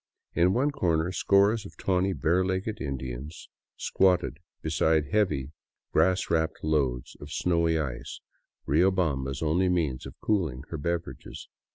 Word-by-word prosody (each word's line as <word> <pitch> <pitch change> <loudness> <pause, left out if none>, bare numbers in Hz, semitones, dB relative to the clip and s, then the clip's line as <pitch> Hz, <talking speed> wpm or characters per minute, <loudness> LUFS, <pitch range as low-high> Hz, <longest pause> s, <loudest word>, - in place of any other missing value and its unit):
In 90 +2 +4
one 140 +4 +2
corner 85 - +1
scores 100 +3 +3
of - - -12
tawny, 95 0 +1
bare 85 +3 +2
legged 95 +4 -2
Indians 65 +2 -5 0.3
squatted 90 -6 +2 0.2
beside 80 -3 +2
heavy 75 -11 +1 0.4
grass 95 +1 +2
wrapped 80 -1 0
loads 70 -6 0
of 75 0 -9
snowy 85 -1 +1
ice, 65 -5 -4 0.5
Riobamba's 75 -5 +1
only 90 +4 +2
means 75 -8 0
of - - -13
cooling 80 -12 0
her 80 - -4
beverages. 85 +3 -4
80 Hz, 130 wpm, -28 LUFS, 70-95 Hz, 0.5 s, In